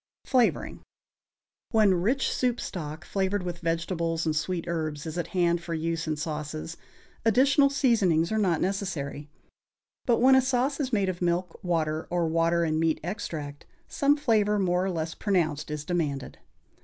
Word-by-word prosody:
=Flavoring.= 250 Hz, -3 st, +1 dB, 0.9 s
When 215 Hz, -4 st, +4 dB
rich 255 Hz, +8 st, +1 dB
soup 245 Hz, -2 st, 0 dB
stock, 160 Hz, -2 st, -6 dB
flavored 195 Hz, 0 st, -1 dB
with 175 Hz, -1 st, -5 dB
vegetables 165 Hz, 0 st, -1 dB
and 155 Hz, -1 st, 0 dB
sweet 170 Hz, +2 st, -2 dB
herbs, 155 Hz, -3 st, -3 dB
is 160 Hz, 0 st, -5 dB
at 175 Hz, -, -2 dB
hand 175 Hz, -2 st, +1 dB
for 170 Hz, -1 st, -4 dB
use 165 Hz, 0 st, -2 dB
in 155 Hz, -, 0 dB
sauces, 155 Hz, +1 st, -4 dB, 0.5 s
additional 270 Hz, +5 st, +4 dB
seasonings 215 Hz, -, +2 dB
are 220 Hz, -, +1 dB
not 180 Hz, -6 st, +1 dB
necessary; 170 Hz, -7 st, -3 dB, 0.8 s
but 235 Hz, -2 st, +4 dB
when 260 Hz, +2 st, +5 dB
a 265 Hz, -, +7 dB
sauce 265 Hz, +2 st, 0 dB
is 265 Hz, -3 st, -1 dB
made 200 Hz, -4 st, +1 dB
of 185 Hz, -1 st, -3 dB
milk, 175 Hz, 0 st, -1 dB
water, 160 Hz, -3 st, -1 dB
or 175 Hz, -1 st, 0 dB
water 165 Hz, +1 st, +2 dB
and 155 Hz, -1 st, 0 dB
meat 165 Hz, -1 st, +1 dB
extract, 160 Hz, -6 st, -5 dB, 0.2 s
some 290 Hz, +1 st, +2 dB
flavor 215 Hz, -7 st, +2 dB
more 180 Hz, -2 st, +1 dB
or -, -, 0 dB
less 165 Hz, -2 st, -3 dB
pronounced 160 Hz, -8 st, 0 dB
is 150 Hz, 0 st, -4 dB
demanded. 150 Hz, -6 st, -2 dB
175 Hz, 160 wpm, -27 LUFS, 160-210 Hz, 0.9 s, a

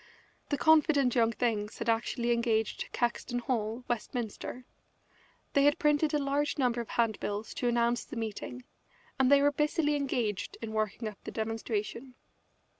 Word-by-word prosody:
The 285 Hz, -, 0 dB
confident 295 Hz, -5 st, +4 dB
young 230 Hz, -2 st, +3 dB
things 220 Hz, -2 st, -1 dB
had 230 Hz, -, -4 dB
actually 235 Hz, +1 st, +1 dB
engaged 230 Hz, -2 st, 0 dB
Caxton 245 Hz, 0 st, -1 dB
Hall, 235 Hz, -1 st, -2 dB
Westminster; 240 Hz, +1 st, -4 dB, 0.9 s
they 280 Hz, -, +4 dB
had 290 Hz, -, +6 dB
had -, -, -20 dB
printed 300 Hz, -1 st, +2 dB
a 300 Hz, -, +2 dB
large 285 Hz, +1 st, 0 dB
number 245 Hz, -3 st, +1 dB
of 230 Hz, -, -9 dB
handbills 215 Hz, -2 st, -1 dB
to 245 Hz, -, -1 dB
announce 235 Hz, 0 st, +2 dB
the -, -, -9 dB
meeting, 225 Hz, +3 st, -5 dB, 0.6 s
and 265 Hz, 0 st, +4 dB
they 280 Hz, 0 st, +6 dB
were 290 Hz, -, +5 dB
busily 300 Hz, +1 st, +1 dB
engaged 245 Hz, -8 st, -2 dB
in 220 Hz, -1 st, -6 dB
working 215 Hz, +1 st, -1 dB
up 210 Hz, -2 st, -9 dB
the -, -, -6 dB
demonstration. 225 Hz, +3 st, -3 dB
240 Hz, 155 wpm, -30 LUFS, 225-280 Hz, 0.9 s, had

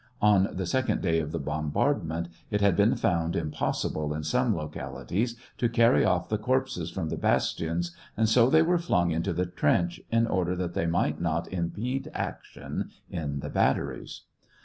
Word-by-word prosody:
(On 100 Hz, -2 st, +5 dB
the 95 Hz, 0 st, -3 dB
second 130 Hz, +8 st, 0 dB
day 80 Hz, -3 st, +2 dB
of 75 Hz, -1 st, -3 dB
the 85 Hz, -, -2 dB
bombardment, 80 Hz, -, -1 dB, 0.2 s
it 105 Hz, -, 0 dB
had 100 Hz, -3 st, +4 dB
been 100 Hz, +4 st, +4 dB
found 85 Hz, -1 st, 0 dB
impossible, 75 Hz, -1 st, -1 dB
in 75 Hz, -, -4 dB
some 120 Hz, -, +1 dB
localities, 95 Hz, +8 st, -3 dB, 0.2 s
to 120 Hz, -, +2 dB
carry 115 Hz, +1 st, +4 dB
off 90 Hz, -1 st, +1 dB
the 105 Hz, -, -1 dB
corpses 125 Hz, -8 st, 0 dB
from 85 Hz, -4 st, -3 dB
the -, -, -3 dB
bastions, 85 Hz, +6 st, 0 dB, 0.2 s
and 110 Hz, 0 st, +3 dB
so 115 Hz, +2 st, +5 dB
they 160 Hz, +3 st, +6 dB
were 175 Hz, +1 st, +2 dB
flung 90 Hz, -, +1 dB
into 85 Hz, +4 st, 0 dB
the 90 Hz, +2 st, 0 dB
trench, 85 Hz, -1 st, +1 dB
in 115 Hz, 0 st, +3 dB
order 90 Hz, -4 st, 0 dB
that 90 Hz, -1 st, -3 dB
they 85 Hz, -, 0 dB
might 85 Hz, -2 st, 0 dB
not 85 Hz, +1 st, -1 dB
impede 110 Hz, +10 st, -2 dB
action -, -, -5 dB, 0.2 s
in 75 Hz, -4 st, -3 dB
the -, -, -5 dB
bat -, -, +3 dB
teries.) -, -, -6 dB
90 Hz, 175 wpm, -28 LUFS, 80-115 Hz, 0.2 s, they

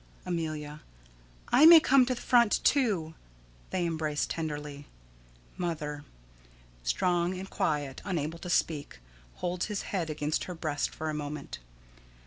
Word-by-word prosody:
Amelia: 155 Hz, -3 st, -4 dB, 0.7 s
I 280 Hz, +6 st, +7 dB
may 335 Hz, -1 st, +11 dB
come 265 Hz, -4 st, +4 dB
to 255 Hz, -, 0 dB
the -, -, -9 dB
front, 235 Hz, -3 st, +4 dB
too. 200 Hz, -, +2 dB, 0.6 s
[They 180 Hz, -2 st, -1 dB
embrace 155 Hz, -3 st, -1 dB
tenderly.] 150 Hz, -3 st, -5 dB, 0.7 s
Mother: 150 Hz, -4 st, -3 dB, 0.8 s
[_Strong 175 Hz, -, +1 dB
and 190 Hz, +1 st, -6 dB
quiet, 145 Hz, -7 st, -2 dB
unable 165 Hz, -3 st, -3 dB
to 180 Hz, -, -7 dB
speak, 155 Hz, -, 0 dB, 0.4 s
holds 175 Hz, 0 st, -2 dB
his 210 Hz, -2 st, -3 dB
head 175 Hz, -5 st, -1 dB
against 150 Hz, 0 st, -1 dB
her 180 Hz, -, -6 dB
breast 155 Hz, -3 st, -2 dB
for 155 Hz, 0 st, -4 dB
a -, -, -5 dB
moment. 150 Hz, -1 st, -5 dB
165 Hz, 130 wpm, -29 LUFS, 150-185 Hz, 0.8 s, may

